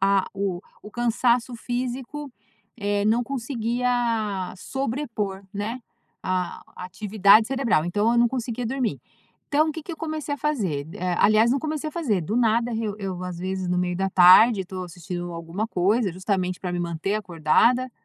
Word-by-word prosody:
ah, 195 0 +3
o 195 -3 -2 0.2
o 210 - -10
cansaço 240 +1 +1
físico, 255 +4 -4 0.5
eh, 205 -1 0
não 225 +3 +3
conseguia 235 -5 -1
sobrepor, 225 -5 -3
né, 210 +5 -3 0.4
a 185 -1 -2
atividade 200 +3 +3
cerebral. 255 - +1
Então, 205 +6 +1
eu - - +1
não 235 0 +5
conseguia 245 -1 -3
dormir. 250 -1 -1 0.5
Então, 305 +2 +3
o - - -1
que 320 - -7
que 335 - -7
eu - - -7
comecei 310 -2 -3
a - - -10
fazer? 195 - -1
Eh 180 0 -1
aliás 215 +2 +5
não 270 - +2
comecei 310 +1 -3
a - - -10
fazer, 240 - 0
do 205 +8 -2
nada, 235 0 +2
eu 220 -2 -2
eu, 190 -3 -4
às 180 -1 -5
vezes 185 0 -3
no 180 - +1
meio 180 0 0
da 195 +1 0
tarde, 190 +4 +7
estou 185 0 -6
assistindo 175 0 -6
alguma 170 +5 -4
coisa 200 +3 +1
justamente 185 0 -1
pra 180 -2 -3
me 175 - -2
manter 170 +3 -2
acordada, 215 +7 +2
215 Hz, 170 wpm, -24 LUFS, 185-245 Hz, 0.5 s, tarde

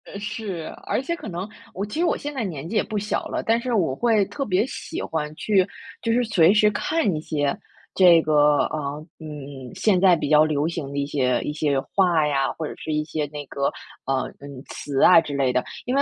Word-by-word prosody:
呃， - - -9
是。 205 -5 -5
而 - - 0
且 340 +6 -2
可 340 - -9
能 180 +2 -4 0.3
我 195 - -3
其 240 +10 -5
实 350 - +3
我 - - +1
现 290 +1 -5
在 260 -4 -2
年 160 -7 -5
纪 225 - -5
也 215 - +3
不 215 0 -4
小 210 +1 -2
了， - - -3
但 225 +1 +3
是 250 0 -2
我 165 -11 +1
会 220 - +2
特 275 - -4
别 200 0 +2
喜 - - -6
欢 150 -2 -3
去 195 +1 +2 0.3
就 230 - 0
是 245 +2 +3
随 195 -6 +4
时 210 0 +5
看 210 - 0
一 155 - -3
些 145 -3 -1 0.4
这 175 -3 +7
个， 150 -1 +4
啊， 155 - -3 0.4
嗯， 140 -4 -8
现 200 -4 +2
在 185 -1 +6
比 150 -3 -3
较 150 0 +6
流 155 -1 0
行 165 -5 -4
的 140 - -5
一 140 - 0
些 130 -4 +1
一 150 - -3
些 145 -2 +1
话 170 +1 +2
呀， 135 -2 +1
或 160 - -4
者 - - -6
是 155 - -4
一 150 0 0
些 155 -1 -3
那 145 0 -7
个， 140 0 -3 0.4
呃， 135 -1 0 0.2
嗯， 140 -2 -9
词 140 -2 -3
啊 180 - +8
之 150 -3 -6
类 135 -2 +1
的。 125 - +1 0.2
因 250 - -1
为 280 - +4
160 Hz, 250 characters per minute, -23 LUFS, 145-210 Hz, 0.4 s, 啊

